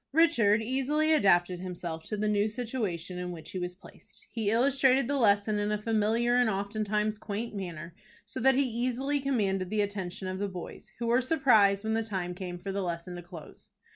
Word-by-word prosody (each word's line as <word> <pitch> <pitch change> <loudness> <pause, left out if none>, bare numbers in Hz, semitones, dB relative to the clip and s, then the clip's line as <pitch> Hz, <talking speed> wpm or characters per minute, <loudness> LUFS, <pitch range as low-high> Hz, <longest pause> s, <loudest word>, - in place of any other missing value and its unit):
Richard 235 -10 +4
easily 280 +6 +1
adapted 180 - +3
himself 175 -3 -5
to 215 - -4
the 215 +1 0
new 210 0 +2
situation 210 -7 -4
in 180 0 -4
which 165 -2 -9
he 185 - -4
was 180 0 -4
placed. 190 - -15
He 220 -3 -1
illustrated 260 +2 +3
the 285 - 0
lesson 205 -1 +3
in 205 0 -1
a 210 - +1
familiar 225 +3 +1
and 245 -2 +3
oftentimes 210 +1 -1
quaint 220 +3 -4
manner, 170 -4 -6 0.3
so - - -6
that 265 +2 +4
he 280 - +3
easily 255 +4 -1
commanded 200 -9 0
the 215 +1 +1
attention 195 -2 -4
of 185 0 -4
the 205 - -1
boys, 185 -3 -9
who 235 - -3
were 240 +2 +3
surprised 220 -8 +4
when 220 0 -1
the 225 - +1
time 185 -5 -3
came 180 -1 -6
for 195 +2 -5
the 200 +1 -2
lesson 175 0 -4
to - - -7
close. 175 -2 -12
210 Hz, 200 wpm, -29 LUFS, 185-240 Hz, 0.3 s, Richard